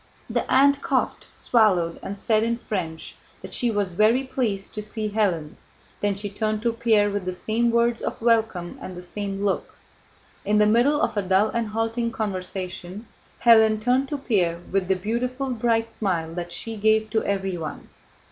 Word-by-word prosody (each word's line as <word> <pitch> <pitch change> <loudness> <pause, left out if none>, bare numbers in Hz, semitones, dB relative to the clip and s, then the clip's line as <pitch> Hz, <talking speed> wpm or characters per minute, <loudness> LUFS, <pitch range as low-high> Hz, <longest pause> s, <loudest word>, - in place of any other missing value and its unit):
The - - -2
aunt 280 +1 +5
coughed, 265 -3 -1
swallowed, 185 -8 +2
and 200 +1 -6
said 215 +2 +2
in 230 +1 0
French 170 -9 -5 0.3
that - - -8
she 245 - +2
was 205 -4 0
very 215 +8 +3
pleased 240 -7 -2
to 210 - -4
see 215 0 -3
Hélène, 180 -8 0 0.5
then 205 -1 0
she 205 +1 -4
turned 215 +1 -2
to 235 -1 +1
Pierre 220 -3 +2
with 200 -1 -2
the 185 - -2
same 225 +5 0
words 235 0 +2
of - - -4
welcome 225 -7 +1
and 185 -1 -7
the 180 - -8
same 200 +2 -4
look. 195 - -1 0.7
In 210 +1 +2
the 210 - +5
middle 240 +7 +3
of 265 - 0
a - - +3
dull 190 +3 +2
and 235 -1 -1
halting 225 +2 -1
conversation, 185 0 -5 0.4
Hélène 220 -2 +6
turned 250 +4 +1
to 290 - -2
Pierre 180 -10 0
with 190 -1 0
the 190 - +2
beautiful 250 +7 -2
bright 230 -1 0
smile 170 -7 -2
that 175 0 -5
she 225 +5 -5
gave 220 +1 +2
to 220 -1 +1
everyone. 190 -5 -3
215 Hz, 175 wpm, -24 LUFS, 190-235 Hz, 0.7 s, Hélène